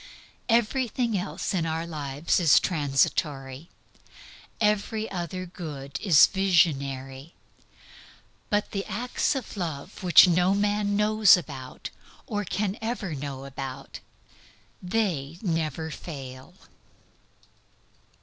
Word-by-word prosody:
Everything 235 0 +1
else 195 +1 -3
in 180 -3 0
all 160 - -1
our 165 +1 -3
lives 150 -1 -1
is 165 -5 +6
transitory. 140 -2 -1 0.9
Every 210 +1 0
other 185 0 -4
good 150 -6 -7
is 175 -8 +7
visionary. 140 -7 0 1.1
But 205 0 0
the 195 -1 -2
acts 245 +7 -1
of 260 -5 -5
love 170 -1 -5
which 180 -1 +8
no 180 +2 +3
man 205 0 0
knows 210 -1 +5
about, 135 -6 -8 0.3
or 205 -2 -2
can 200 +2 -2
ever 220 -6 -3
know 135 -1 -6
about 135 0 -7 0.8
they 180 -7 -1
never 160 -3 -2
fail. 135 0 -9
175 Hz, 100 wpm, -26 LUFS, 140-205 Hz, 1.1 s, which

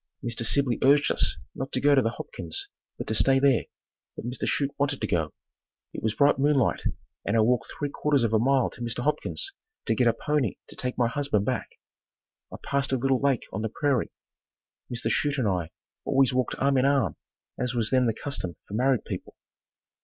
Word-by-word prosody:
Mr. 115 0 -2
Sibley 125 +1 +1
urged 145 +2 +5
us - - +2 0.2
not 135 +1 -5
to - - +2
go 145 +2 +4
to 135 - +5
the 115 - +1
Hopkins', 85 -7 -5 0.3
but - - -5
to - - -2
stay 135 +4 +4
there, 135 -3 +3 0.5
but - - -7
Mr. 125 +1 -2
Chute 140 -1 +1
wanted 140 -1 +1
to - - -1
go. 80 -7 0 0.6
It - - -6
was 110 0 -1
bright 140 +3 +4
moonlight, 140 -3 +2 0.4
and 100 +3 +1
I - - +5
walked 120 +2 +2
three 145 -1 -4
quarters 145 -4 +1
of 115 -1 0
a 110 - +4
mile 130 +1 +2
to - - -12
Mr. 120 0 -2
Hopkins' 150 - -1 0.3
to - - +2
get 125 - +2
a 115 - +4
pony 140 -3 0
to - - -10
take 125 0 -3
my 120 - +3
husband 130 -5 0
back. - - -3 0.7
I - - -6
passed 140 -1 0
a 130 - +2
little 135 +1 +1
lake 140 -3 +1
on 105 - -2
the 110 - -2
prairie. 140 0 0 0.8
Mr. 120 -1 -1
Chute 145 0 +1
and 125 -5 +1
I 90 -4 -1 0.3
always 135 -2 +3
walked 125 -1 0
arm 135 0 +2
in 130 - +3
arm 140 -1 +2 0.4
as 125 0 -1
was 115 -2 +1
then 130 -2 +3
the 115 - +1
custom 105 -12 -4
for - - -10
married 130 +2 +2
people. - - -6
130 Hz, 205 wpm, -27 LUFS, 115-140 Hz, 0.8 s, urged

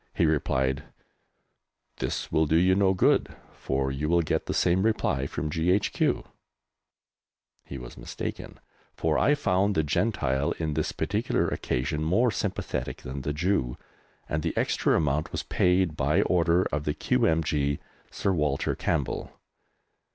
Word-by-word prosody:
He - - +3
replied, 65 -2 0 1.1
"This - - -3
will 80 0 +2
do 80 - +2
you 90 +3 +5
no 95 0 +3
good, 90 - +2 0.2
for 65 0 -2
you 75 +3 -2
will 85 0 +3
get - - -1
the - - -1
same 90 +1 +3
reply 110 +2 +1
from 75 +1 -4
G.H.Q." 90 +6 +1 1.4
He 70 - -7
was 60 -2 -10
mistaken, - - -6 0.4
for 80 -1 +1
I 145 - +4
found 100 -7 +1
the 80 - +2
Gentile, 70 - 0
on 80 -2 -1
this 75 +1 -1
particular - - 0
occasion, 75 +5 -2
more 110 +10 +3
sympathetic 100 -3 -3
than 65 +2 -5
the 75 - -2
Jew, 75 -6 0 0.5
and 75 - -1
the - - -3
extra - - +2
amount 75 -1 0
was - - -3
paid 90 -3 +2
by 75 +8 +2
order 90 0 +3
of 75 0 -2
the 75 - -1
Q.M.G., 75 -3 +1 0.3
Sir 100 - -1
Walter 75 -4 0
Campbell. - - -2
80 Hz, 145 wpm, -27 LUFS, 70-90 Hz, 1.4 s, you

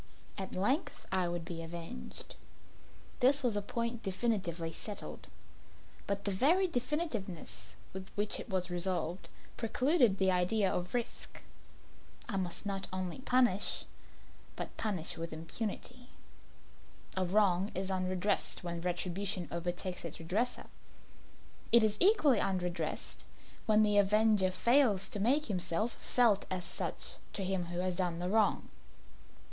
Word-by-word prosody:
At 190 -2 -4
length 270 - 0
I 185 -2 +2
would 175 -1 -3
be 165 -1 -5
avenged; 170 +7 -7 0.9
this 275 +2 +5
was 240 -4 +2
a 205 - +1
point 235 +3 -3
definitely 185 -5 -1
settled 205 +5 -6 0.8
but 200 0 -2
the 200 - +1
very 325 - +4
definitiveness 245 - -3 0.2
with 190 0 -7
which 205 0 +1
it - - -8
was 185 -1 -1
resolved, 175 0 0 0.3
precluded 245 - +3
the 190 -1 +3
idea 185 +2 +3
of 180 +5 -2
risk. 240 -1 -3 0.8
I 205 - -2
must 180 +1 -3
not 195 -1 -2
only 185 +3 -3
punish, 250 -7 +2 0.7
but - - -5
punish 195 -7 -2
with 165 0 -4
impunity. 225 +9 -2 1.1
A 190 - +1
wrong 190 0 +2
is 190 +1 -2
unredressed 185 +1 0
when 170 -1 -3
retribution 180 +1 -1
overtakes 175 +2 -3
its 170 - -5
redresser. 210 +10 -1 1.1
It 235 -1 +8
is 215 -1 +2
equally 330 - +6
unredressed 180 -2 -2 0.4
when 215 0 +5
the 205 -1 +4
avenger 210 -1 +4
fails 210 0 +3
to 205 - -2
make 270 +9 +3
himself 200 +2 -1
felt 230 -5 +3
as 180 -1 -2
such - - -2 0.2
to 195 - -2
him 185 -1 0
who 175 0 -5
has 185 -1 -1
done 175 -3 0
the 180 +1 -2
wrong. 215 0 +2
195 Hz, 130 wpm, -33 LUFS, 180-230 Hz, 1.1 s, It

